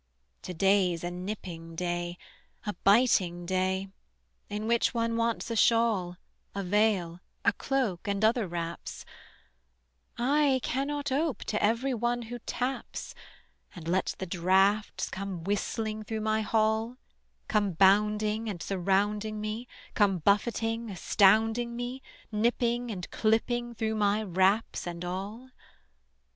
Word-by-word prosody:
To 180 - -6
day's 185 -2 +3
a 175 - -2
nipping 180 -3 -6
day, 175 0 -2 0.5
a 210 - -2
biting 195 -6 +4
day; 190 +1 0 0.6
In 210 +1 -3
which 235 +2 +2
one 230 0 0
wants 230 0 -1
a - - -1
shawl, 220 -6 +3 0.4
A 200 - -2
veil, 190 -3 +1 0.3
a 200 - +5
cloak, 230 -7 -1
and 200 +1 +1
other 225 -2 +2
wraps: 170 -1 -5 1.1
I 275 +2 +3
cannot 280 +2 -2
ope 290 +1 0
to 215 - -2
every 235 +5 +2
one 240 +1 -1
who 240 +2 -7
taps, 255 +2 -3 0.6
And 165 -3 -9
let 185 +2 0
the 190 - -4
draughts 190 +4 +2
come 190 -3 -5
whistling 215 +3 -2
through 220 +1 -4
my 215 0 +1
hall; 220 +2 +1 0.5
Come 205 -3 +1
bounding 210 +4 +3
and 190 -4 -5
surrounding 205 +4 0
me, 215 +3 -4 0.3
Come 200 -3 +3
buffeting, 225 +5 +1
astounding 220 +5 +3
me, 245 +2 -4 0.3
Nipping 240 +2 +1
and 185 -5 -5
clipping 240 +2 0
through 220 0 -1
my 210 0 +1
wraps 190 +2 +1
and 170 0 -5
all. 205 +8 -5
210 Hz, 125 wpm, -29 LUFS, 190-230 Hz, 1.1 s, a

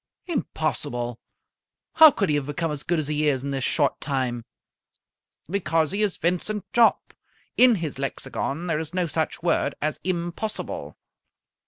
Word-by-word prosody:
"Impossible! 145 - -2 0.7
How 320 0 +10
could 200 - -1
he - - +2
have 145 -2 0
become 155 +2 -2
as 145 -2 -4
good 175 +2 0
as 155 -3 -1
he 150 0 0
is 135 -3 +1
in 140 - -3
this 135 -1 -2
short 145 0 +1
time?" 125 -4 -2 1.0
"Because 165 -3 +1
he 200 +2 -1
is 205 -3 +1
Vincent 180 +4 -1
Jopp! 235 -1 +3 0.4
In 250 -2 +6
his 160 -8 -4
lexicon 135 +3 -3
there 165 -3 0
is 160 +2 -6
no 180 -1 +1
such 160 +1 -2
word 165 -4 +1
as 155 0 -2
impossible." 180 +4 -4
160 Hz, 155 wpm, -25 LUFS, 145-180 Hz, 1.0 s, How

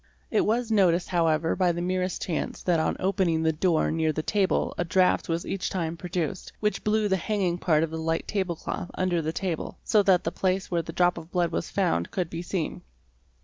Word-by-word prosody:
It 215 - +3
was 230 +1 0
noticed 185 -5 +3
however 165 -2 +2
by 180 -2 +3
the 170 - -4
merest 185 0 -1
chance 165 -4 -3
that 175 -3 +2
on 160 - 0
opening 185 -4 +1
the 160 0 +2
door 160 0 +1
near 160 0 +1
the 155 +1 -3
table 200 0 +1
a - - 0
draught 180 +1 +2
was 165 +1 -1
each 195 - -2
time 170 -3 -2
produced, 175 -1 -4
which 210 0 -1
blew 215 0 +2
the 190 -1 +2
hanging 185 -2 -1
part 160 -4 +3
of 165 - -2
the 160 - -4
light 165 0 -1
table 190 -4 -1
cloth 175 - -5
under 180 -2 +1
the 160 0 -2
table, 175 -2 -3
so 210 - +4
that 190 -3 +4
the 165 - -1
place 185 +1 -1
where 170 -1 +1
the 165 - -7
drop 175 +1 +2
of 165 0 -12
blood 175 -2 +1
was 85 - -2
found 85 +1 0
could 180 -3 -3
be 165 - -4
seen. 175 -2 -3
175 Hz, 220 wpm, -26 LUFS, 165-190 Hz, -, so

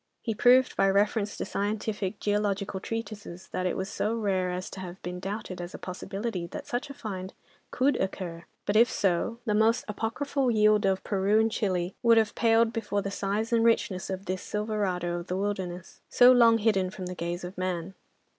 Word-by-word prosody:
He 225 - -1
proved 250 +4 +5
by 195 - +3
reference 205 +1 +1
to - - -3
scientific 205 -1 -2
geological 205 -2 -1
treatises 210 -4 -6
that 185 0 -1
it - - -2
was 190 - -2
so 215 +2 -1
rare 195 -5 0
as 180 +1 -4
to - - -8
have 185 0 -7
been 180 +1 -5
doubted 195 -1 -5
as 175 +1 -7
a - - -5
possibility 195 0 -4
that - - -7
such 275 +2 -3
a - - -6
find 190 -5 -6 0.3
could 275 +3 +2
occur, 175 -3 -4 0.2
but 205 - 0
if 230 +2 +6
so, 195 +4 0
the 215 - +1
most 220 +2 +3
apocryphal 250 +6 -1
yield 215 -2 +4
of 190 0 0
Peru 200 +1 +2
and 220 0 +2
Chile 185 -4 -1
would 230 -1 +5
have 220 -2 +3
paled 230 0 +3
before 205 -3 -2
the 200 - -3
size 205 +4 -2
and 230 -1 +4
richness 210 -5 +1
of 190 +1 -4
this 185 -1 -3
Silverado 195 -5 -2
of 175 - -9
the 180 - -2
Wilderness, 190 -3 -4
so 245 0 +7
long 235 -2 +6
hidden 205 -4 +2
from 185 0 -7
the 180 - -4
gaze 175 0 -4
of 180 +2 -7
man. 185 0 -3
200 Hz, 195 wpm, -28 LUFS, 185-225 Hz, 0.3 s, so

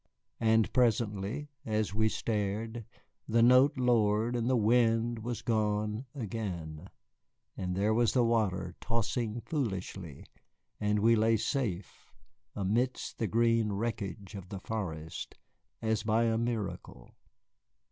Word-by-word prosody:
And 110 -1 +3
presently, 115 +2 +1
as 110 -2 -1
we 110 +1 +2
stared, 110 +2 -2 0.4
the 115 +1 +3
note 130 +4 +6
lowered 115 -2 +2
and 120 0 0
the 130 - +3
wind 115 +1 +3
was 120 +1 -4
gone 105 +1 0
again, 95 - -5 0.7
and 90 -1 -3
there 105 +3 +2
was 120 0 +3
the 125 - +4
water 95 -6 0
tossing 115 0 -1
foolishly, 95 - -4 0.5
and 105 0 +1
we 115 +3 +5
lay 110 +1 +3
safe 105 -6 -3 0.4
amidst 115 +6 -1
the 110 - 0
green 115 0 +2
wreckage 100 -3 -4
of 95 -3 -8
the 100 - -5
forest 80 -7 -5 0.5
as 110 0 +1
by 110 +1 +2
a 115 -1 +2
miracle. 115 - -4
110 Hz, 120 wpm, -31 LUFS, 100-115 Hz, 0.7 s, note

